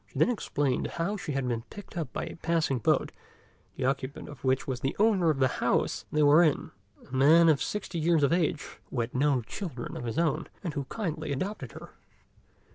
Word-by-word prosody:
She - - -12
then - - +4
explained 145 - -1
how 175 +5 0
she 170 -7 -4
had 135 -2 -1
been 120 -2 -1
picked 205 -2 -11
up 160 -7 -3
by - - -3
a - - -7
passing 165 -6 0
boat, - - +2 0.6
the 130 - -2
occupant 135 +1 -2
of 145 -4 -11
which 130 0 +1
was 130 -2 -3
the 135 +2 -2
owner 200 -5 +3
of 155 - +1
the 130 -1 +4
house - - +1
they 150 0 +3
were 145 +3 +7
in, 155 -5 +1 0.4
a 130 - -7
man 160 +6 +6
of 155 -4 +4
sixty 195 -4 -3
years 160 -1 +3
of 140 - +3
age, 165 -3 0 0.2
who 125 - -3
had 115 +1 -4
no 135 -1 +2
children 135 - -6
of 120 - -5
his 115 +4 -3
own, 165 -3 +1 0.2
and 170 -5 -3
who 140 -3 -3
kindly 155 - -4
adopted 190 +10 -4
her. - - -10
150 Hz, 210 wpm, -29 LUFS, 135-170 Hz, 0.6 s, were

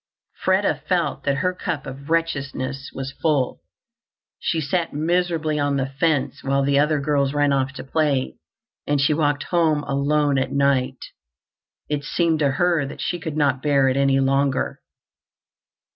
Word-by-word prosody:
Freda - - +2
felt - - 0
that 140 -1 +2
her 180 - +2
cup 170 -5 -4
of 135 +2 -9
wretchedness 140 -5 -2
was 135 0 -6
full. 145 -6 +1 0.8
She 165 - -1
sat 165 +3 -1
miserably 160 -1 0
on 145 -1 +1
the 135 - 0
fence 140 0 0
while 140 0 +1
the 140 0 +3
other 150 +1 +2
girls 140 -1 0
ran 145 -1 +3
off 135 0 0
to - - -7
play, 140 -2 0 0.5
and 145 0 +1
she 145 +2 +3
walked 145 -1 +1
home 160 -4 +1
alone 140 0 +1
at 130 - -2
night. 135 -2 +1 0.8
It 145 -1 -2
seemed 165 +1 +1
to 140 -3 +2
her 170 0 +2
that - - -9
she 175 - -2
could 160 -2 -5
not 140 -3 +2
bear 140 -2 +3
it 130 - 0
any 135 0 +3
longer. 135 0 0
145 Hz, 160 wpm, -22 LUFS, 135-155 Hz, 0.8 s, the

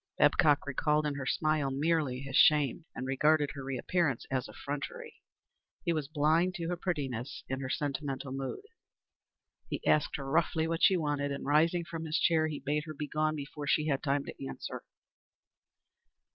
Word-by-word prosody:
Babcock 150 -2 +4
recalled 150 +2 +1
in 150 - 0
her 140 -2 -5
smile 155 -2 +1
merely 140 -2 0
his 135 -1 -5
shame, 150 +1 +4
and 130 - -4
regarded 145 +2 +2
her 140 -2 -7
reappearance 135 +1 0
as 130 -1 -1
effrontery. 140 -1 -6 0.6
He 170 - +2
was 155 -3 -2
blind 160 +4 +2
to 170 -3 -3
her 180 - 0
prettiness 140 -9 -3
and 135 +1 -3
her 130 - -4
sentimental 140 -1 -3
mood. 135 - -4 1.1
He - - -4
asked 150 -1 +3
her 140 - -5
roughly 160 +2 +1
what 165 0 -2
she 190 - +6
wanted, 145 -3 -1
and 140 - -4
rising 165 +4 +3
from 165 0 -6
his 155 +1 0
chair, 160 -2 +3
he 150 -2 -4
bade 150 +1 -1
her 155 -1 -7
be 150 +1 -4
gone 155 +1 0
before 145 0 -6
she 155 +2 +2
had 135 -2 +1
time 140 -1 0
to - - -6
answer. - - -6
150 Hz, 175 wpm, -31 LUFS, 140-155 Hz, 1.1 s, she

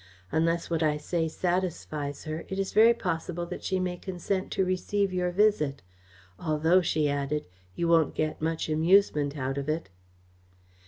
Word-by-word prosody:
Unless 165 +1 0
what 165 -1 +1
I 150 -1 +2
say 165 +2 -1
satisfies 160 -5 -2
her, 155 +1 -4
it 190 - -4
is 195 -1 -2
very 225 +2 +7
possible 175 -4 -3
that 180 +1 -7
she 190 -1 0
may 180 -1 -2
consent 190 +1 -3
to 190 - +1
receive 190 +1 0
your 180 -1 0
visit. 175 - +2 0.6
Although," 160 +3 +3
she 155 -3 +1
added, 145 +1 -1 0.3
"you 170 - 0
won't 165 -2 +3
get 155 0 -2
much 160 +1 -1
amusement 155 -2 +3
out 135 0 -2
of 140 +2 -4
it." 155 -4 -2
165 Hz, 160 wpm, -28 LUFS, 155-185 Hz, 0.6 s, very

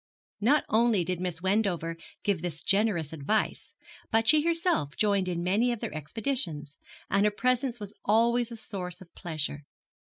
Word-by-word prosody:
Not 270 +8 +3
only 220 -4 +3
did 180 +1 -2
Miss 180 -2 -3
Wendover 190 -4 0 0.3
give 200 -5 0
this 170 -2 -3
generous 195 -7 +1
advice, 160 +8 -1 0.3
but 225 0 +2
she 310 -1 +7
herself 330 - 0
joined 200 -3 +2
in 170 -1 -2
many 210 +7 +2
of 235 - -3
their - - -5
expeditions, 155 - -3 0.3
and 200 0 +3
her 210 - +5
presence 250 +2 0
was 205 0 -7
always 235 +3 +2
a 230 - -6
source 185 -4 -4
of 175 - -15
pleasure. 150 -3 -4
200 Hz, 160 wpm, -28 LUFS, 170-230 Hz, 0.3 s, she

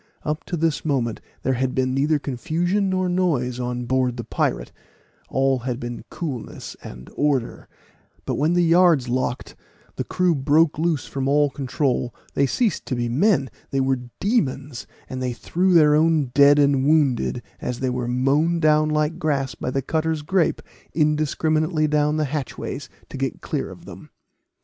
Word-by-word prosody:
Up 150 +1 -2
to 175 - -3
this 160 -1 0
moment 130 -7 -1 0.2
there 130 - +1
had 130 +1 -1
been 130 0 +1
neither 145 +3 +2
confusion 170 +9 -1
nor 185 0 0
noise 150 -9 0
on 125 0 -3
board 125 0 0
the 120 - -4
pirate - - -2 0.6
all 135 -1 +1
had 125 0 -3
been 120 -1 -6
coolness 140 -9 -6
and 60 +1 -10
order; 140 -5 -1 0.6
but - - -2
when 155 +4 +1
the 175 0 +3
yards 165 -6 +4
locked 125 0 -2 0.4
the - - -1
crew 180 -1 +1
broke 150 +2 +2
loose 160 -4 0
from 135 -1 -3
all 145 0 +3
control 130 -2 -1 0.2
they 140 - +2
ceased 225 - 0
to 130 - -1
be 120 -1 -1
men 140 - +2 0.2
they 135 - -1
were 135 -1 +1 0.2
demons, 145 - -1 0.2
for 130 - -6
they 130 -1 -2
threw 180 +8 +1
their 150 -3 +6
own 155 -3 +2
dead 140 +1 +6
and 140 -2 +3
wounded, 140 -5 +2 0.2
as 125 -1 -3
they 130 -1 0
were 125 -1 -2
mown 140 +7 +2
down 155 -1 +3
like 150 +1 0
grass 140 -4 0
by - - -4
the 135 +1 -1
cutter's 160 +1 -1
grape, 180 +2 +1 0.3
indiscriminately 155 +1 +1
down 150 0 +1
the 155 - +1
hatchways 140 -1 -5 0.2
to - - -8
get - - -2
clear - - -3
of - - -12
them. - - -11
145 Hz, 170 wpm, -23 LUFS, 130-160 Hz, 0.6 s, their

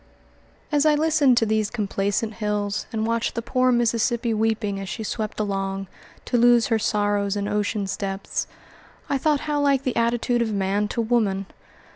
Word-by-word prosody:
As 295 -1 +3
I 305 -1 +4
listened 300 -4 +3
to 225 - +4
these 215 -1 0
complacent 205 0 -1
hills 210 -2 -2
and 220 -1 -1
watched 230 0 -1
the 230 - -3
poor 255 +2 +2
Mississippi 235 0 +1
weeping 220 -2 0
as 195 -1 -6
she 220 - -4
swept 215 0 -4
along, 195 -1 -2 0.4
to 245 - +1
lose 240 -1 +5
her 225 -2 +2
sorrows 205 -1 0
in 205 0 -2
ocean's 205 -1 -1
depths, 195 -1 -3 0.6
I 280 - +1
thought 295 0 +1
how 295 -1 -1
like 275 -2 +2
the 255 -3 -2
attitude 235 +1 +1
of 225 -2 0
man 200 +1 0
to 235 - -2
woman. 215 -4 +1
220 Hz, 170 wpm, -23 LUFS, 205-240 Hz, 0.6 s, lose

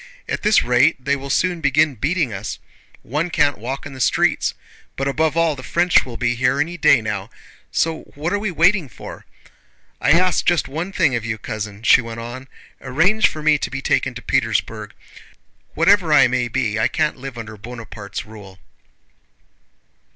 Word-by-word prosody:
At - - -3
this 210 0 +4
rate 125 +6 +3
they 140 - +2
will 140 0 -7
soon 175 +4 0
begin 145 +1 +3
beating 140 - -1
us. 100 +2 -5 0.5
One 150 +8 -2
can't 145 -6 +1
walk 130 +5 -5
in 145 - -8
the 130 - -7
streets. - - +1 0.4
But, 135 - -2
above 155 +3 0
all, 165 -2 +2
the 130 - -9
French 170 +6 +2
will 120 -2 -7
be 120 0 0
here 130 +3 +1
any 165 +2 -1
day 140 -7 +4
now, 105 -2 -4 0.4
so 160 -1 0
what 160 +6 -2
are 205 - +1
we 210 0 -2
waiting 175 -2 +2
for? - - -11 0.7
I 145 - +4
ask 185 +2 +2
just 175 -2 +2
one 165 +7 -4
thing 160 -9 +2
of 120 - -2
you, 110 -1 -3
cousin," 110 -1 -6
she 130 - +6
went 115 -1 -7
on, 120 +3 -8 0.3
"arrange 165 +12 +3
for 155 - -7
me 155 -1 +4
to - - -3
be 135 0 -6
taken 130 -2 0
to 125 - -8
Petersburg. 110 -4 -1 0.8
Whatever 170 0 +3
I 150 - +6
may 125 0 0
be, 110 -1 -1
I 110 - +3
can't 155 -1 -1
live 135 -1 -8
under 110 -2 -7
Bonaparte's 105 -2 -8
rule." 105 -3 -13
135 Hz, 180 wpm, -20 LUFS, 115-160 Hz, 0.8 s, she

